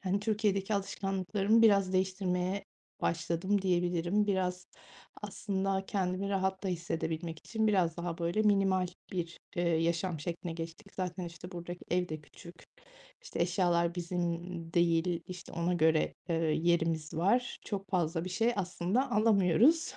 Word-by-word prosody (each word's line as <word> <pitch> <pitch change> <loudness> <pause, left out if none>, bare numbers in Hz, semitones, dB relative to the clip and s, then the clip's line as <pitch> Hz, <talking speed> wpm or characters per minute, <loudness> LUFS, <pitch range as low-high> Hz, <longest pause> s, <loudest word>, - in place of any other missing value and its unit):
hani, 195 +1 0
Türkiye'deki 210 -1 +1
alışkanlıklarımı 195 +2 +1
biraz 200 -4 +5
değiştirmeye 185 0 0 0.4
başladım 170 +4 0
diyebilirim. 180 +2 +1
Biraz 180 -2 -1 0.6
aslında 195 -1 -2
kendimi 190 0 -1
rahat 190 -1 0
da 195 - -1
hissedebilmek 165 -1 -3
için 220 +4 -1
biraz 180 -6 +2
daha 170 0 -4
böyle 170 +6 +1
minimal 195 -3 +3 0.3
bir, 170 -2 -3 0.2
ııı, 175 - +2
yaşam 170 0 0
şekline 170 +1 -4
geçtik. 165 +5 -8
Zaten, 180 -1 -3
işte, 175 +1 -9
buradaki 175 0 -6
evde 175 -3 0
küçük, 170 +3 -13 0.7
işte, - - -6
eşyalar 170 -1 +2
bizim, 175 0 -3
ımm, 170 -1 -3
değil, 170 0 +2
işte, 180 -1 -9
ona 170 +1 0
göre, 160 -1 +3 0.2
ııı, 165 - +2
yerimiz 165 -1 +1
var. 205 +10 +1
Çok 195 -2 -4
fazla 170 -2 0
bir 185 - -5
şey 230 +6 +2
aslında 195 +7 0
alamıyoruz. 220 - +4
180 Hz, 135 wpm, -32 LUFS, 170-195 Hz, 0.7 s, biraz